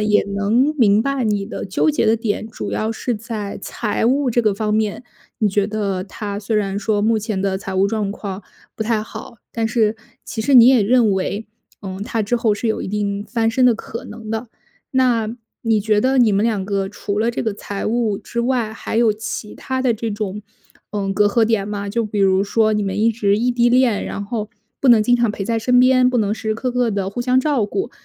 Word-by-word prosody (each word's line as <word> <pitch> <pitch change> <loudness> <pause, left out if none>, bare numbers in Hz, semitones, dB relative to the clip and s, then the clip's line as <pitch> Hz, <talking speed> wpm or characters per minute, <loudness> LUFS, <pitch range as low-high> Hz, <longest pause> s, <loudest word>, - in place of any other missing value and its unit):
也 210 0 +3
能 230 +9 +2
明 210 -2 +4
白 275 -2 -1
你 205 -2 0
的 215 - -6
纠 195 +10 +1
结 290 -6 0
的 220 - +4
点 215 -1 -2
主 - - -6
要 220 +1 -1
是 245 +2 -3
在 210 -2 -5
财 225 +2 -2
务 270 +1 +2
这 240 +1 +2
个 215 -3 +1
方 210 +1 -1
面， 215 +1 0 0.4
你 215 -3 +2
觉 200 0 +1
得 200 -3 -2
他 205 0 -5
虽 215 +1 -2
然 200 -1 -1
说 210 -1 0
目 225 0 +2
前 210 -2 -3
的 195 -1 0
财 190 -1 -6
务 195 +1 +3
状 205 -2 -1
况 195 -2 -6 0.4
不 220 - -2
太 220 -1 0
好， 220 +1 -10
但 230 -1 -1
是 220 -1 +1 0.3
其 225 - -5
实 270 +5 +2
你 240 -2 +9
也 260 -3 +5
认 230 +1 +3
为， 200 +3 -2 0.3
嗯， 190 -1 -6
他 225 0 -1
之 220 +4 0
后 230 -3 +1
是 215 +3 -2
有 220 - -1
一 - - -5
定 200 0 -2
翻 225 0 +1
身 255 +3 +2
的 245 -2 +5
可 230 +3 -7
能 220 -2 -9
的。 225 +2 -3 0.5
那 245 -4 +2 0.3
你 225 -2 +2
觉 210 0 +2
得 260 +3 +2
你 235 -3 +5
们 200 +1 +2
两 215 -4 0
个 195 -1 -1
除 205 0 -4
了 230 +2 +2
这 - - -2
个 220 -3 -1
财 200 0 -6
务 225 -2 0
之 235 - -7
外， 235 -3 0
还 220 - -5
有 230 -2 +4
其 220 0 -6
他 260 -1 -3
的 255 -2 +3
这 225 +1 -4
种， 210 -1 -4 0.5
嗯， 195 -2 -1
隔 205 +2 +3
阂 225 +3 +3
点 220 -3 0
吗？ 205 -1 -4
就 230 +3 -1
比 210 -1 -2
如 190 0 +3
说 215 +1 +2
你 210 -1 0
们 195 0 -2
一 225 +1 +4
直 205 -3 +1
异 240 +3 +1
地 240 0 +3
恋， 245 -4 +3
然 200 - -5
后 215 -1 -4 0.3
不 270 - +2
能 230 -3 +7
经 245 +3 +3
常 235 -2 +1
陪 205 -1 -4
在 230 +2 0
身 250 +2 +3
边， 255 0 +5
不 250 - 0
能 210 -1 +1
时 220 - -6
时 - - +1
刻 250 +3 -2
刻 245 -2 +1
地 200 -2 -2
互 220 - -4
相 255 +1 +3
照 280 -6 +1
顾， 390 - -3
220 Hz, 255 characters per minute, -20 LUFS, 205-235 Hz, 0.5 s, 你